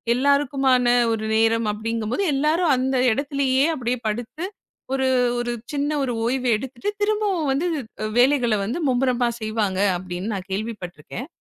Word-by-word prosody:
எல்லாருக்குமான 270 -2 +2 0.3
ஒரு 220 -1 -3
நேரம் 225 0 +2
அப்படிங்கும்போது 225 - -2
எல்லாரும் 305 +3 +2
அந்த 265 +1 0 0.2
இடத்திலேயே, 275 +1 +1
அப்படியே 250 -3 -2
படுத்து 240 +10 -5 0.5
ஒரு 265 -1 +1 0.3
ஒரு 240 0 -2 0.2
சின்ன 290 +1 0
ஒரு 255 - -1
ஓய்வு 255 +1 0
எடுத்துட்டு 260 - -5
திரும்பவும் 410 -6 +1
வந்து 285 +6 0 0.5
வேலைகளை 250 -4 +3
வந்து 240 +11 -3
மும்முரமா 250 -1 +2
செய்வாங்க, 215 -3 -1 0.2
அப்படின்னு 180 +2 -5
நான் 185 -2 -5
கேள்விப்பட்டிருக்கேன். 205 - -5
250 Hz, 125 wpm, -23 LUFS, 225-280 Hz, 0.5 s, வேலைகளை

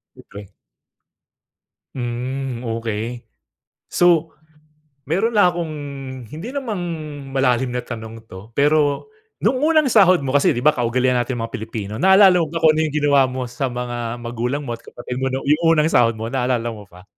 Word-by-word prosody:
Okey. 100 -1 -12 1.5
Hmm, 125 +1 -4
okey. 115 +1 -4 0.6
So, 170 -2 +2 0.7
mayro'n 205 +9 +1
lang 205 -4 +5
akong 170 -2 -4 0.6
hindi 160 - -7
namang 235 -9 -3 0.5
malalim 130 -2 +1
na 125 - -1
tanong 115 -1 -8
‘to, 100 +5 -12
pero 145 - +2 0.3
nung 255 +4 +1
unang 310 -3 +4
sahod 185 - +5
mo 130 - -2
kasi 140 - +3
di - - -1
ba, 150 - +6
kaugalian 125 +1 +1
nating 120 +1 -2
mga 115 - -5
Pilipino, 110 -2 -5
naalala 190 - +6
mo 160 - 0
pa 165 - -2
kung 155 -1 +5
yung 155 -2 0
ginawa 145 -2 +3
mo 130 0 -4
sa 125 +2 -2
mga 120 -1 -4
magulang 120 +5 -3
mo 120 - -4
at - - -22
kapatid 125 +1 -7
mo, 130 - 0
nung 135 - -3
yung 150 +3 +2 0.2
unang 150 +1 +3
sahod 115 -7 +3
mo, 110 +1 -4
naalala 125 -2 0
mo 105 -2 -10
pa? 90 +2 -16
130 Hz, 165 wpm, -20 LUFS, 120-160 Hz, 1.5 s, ba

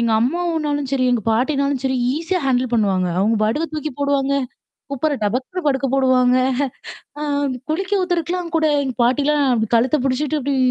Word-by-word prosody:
எங்க 235 -1 +1
அம்மாவுனாலும் 300 -1 -1
சரி, 260 -2 +1
எங்க 230 -4 0
பாட்டினாலும் 275 +2 0
சரி 265 -1 +1 0.2
ஈஸியா 335 +3 -1
ஹேண்டில் 250 -1 0
பண்ணுவாங்க. 195 -5 +1
அவங்க 215 +4 +2
பாட்டுக்கு 295 +9 -1
தூக்கி 305 0 -3
போடுவாங்க. 280 -1 +1 0.6
குப்பர 290 +2 0
டபக்குனு 255 - -2
படுக்க 270 -1 +1
போடுவாங்க. 255 -2 +3 0.8
அ - - -5 0.5
குளிக்க 375 +5 -1
ஊத்துறக்கலாம் 350 -1 -2
கூட 315 -1 +2 0.2
எங்க 260 - -3
பாட்டிலாம் 285 +3 +2
அப்படி 220 -2 0
கழுத்த 245 +5 +3
புடிச்சுட்டு 280 +3 0
அப்படி 280 +1 -1
275 Hz, 150 wpm, -20 LUFS, 250-310 Hz, 0.8 s, போடுவாங்க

